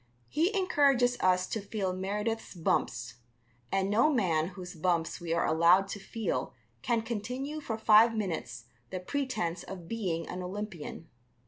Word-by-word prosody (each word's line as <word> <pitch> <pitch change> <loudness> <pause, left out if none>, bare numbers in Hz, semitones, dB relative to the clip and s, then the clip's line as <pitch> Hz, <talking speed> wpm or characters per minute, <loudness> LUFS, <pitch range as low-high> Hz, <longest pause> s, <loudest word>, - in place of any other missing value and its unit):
He 335 +6 +2
encourages 275 -9 +3
us 185 0 +3
to 220 - -3
feel 195 -2 -2
Meredith's 210 +4 -3
bumps, 165 -6 -1 0.5
and 195 0 +1
no 230 +9 +4
man 170 - +2
whose 180 -1 -8
bumps 165 -1 0
we 170 -1 -4
are 170 - +2
allowed 170 +4 +5
to 205 - -5
feel 195 - -3 0.3
can 230 -1 +1
continue 250 +7 -4
for 225 -6 -3
five 225 +1 +6
minutes 155 - -3 0.2
the 185 - -4
pretence 215 -6 -2
of 180 -3 -9
being 180 -7 -2
an 180 - -5
Olympian. 180 -4 -6
195 Hz, 145 wpm, -30 LUFS, 175-230 Hz, 0.5 s, five